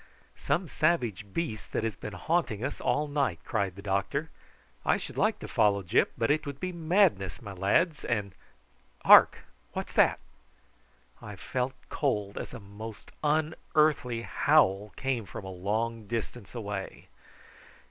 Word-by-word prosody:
"Some 170 +6 0
savage 120 - 0
beast 110 - -4
that - - 0
has 115 -3 -1
been 105 +2 -7
haunting 130 -5 0
us 140 - -4
all 150 +1 +1
night," 140 - 0
cried 100 -5 -1
the 100 - -10
doctor. 105 +10 -1 0.5
"I - - +3
should - - -8
like - - +2
to - - -8
follow 100 -1 +2
Gyp, 85 - +3
but 115 +4 +2
it 155 0 0
would 140 -1 -6
be 185 - -3
madness, 165 - +2
my 100 -3 -8
lads, 140 - +1
and 105 -5 -1 0.7
hark, - - +8 0.3
what's - - -5
that?" - - +4 1.0
I 105 -1 -8
felt 125 +6 -2 0.2
cold 105 -9 -1
as - - -6
a - - -8
most 105 +2 -10
unearthly 150 -5 +1
howl 105 -11 +3
came 125 -6 -2
from - - -8
a 95 - -6
long 110 +4 -2
distance 115 -1 -5
away. 100 -4 -5
115 Hz, 145 wpm, -29 LUFS, 100-150 Hz, 1.0 s, hark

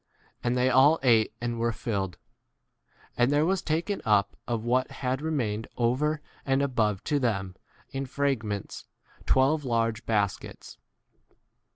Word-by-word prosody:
And 120 +1 +1
they 125 +1 +3
all 140 +5 +6
ate 115 -4 +4
and 120 -1 -3
were 115 0 +1
filled; 100 -5 -3 1.0
and 125 +2 +3
there 145 +2 +3
was 190 +1 +1
taken 170 +6 -1
up 105 -4 +2
of 115 -2 -2
what 125 +2 +1
had 130 +1 -3
re 160 +1 -2
mained 110 -7 -1
over 145 +6 +1 0.2
and 135 +1 +1
above 110 -7 0
to 145 -2 0
them 95 -7 -1 0.4
in 135 0 -4
fragments 120 -8 -2 0.4
twelve 140 +3 +3
large 115 -2 0
baskets. 105 -3 -2
125 Hz, 140 wpm, -27 LUFS, 110-140 Hz, 1.0 s, all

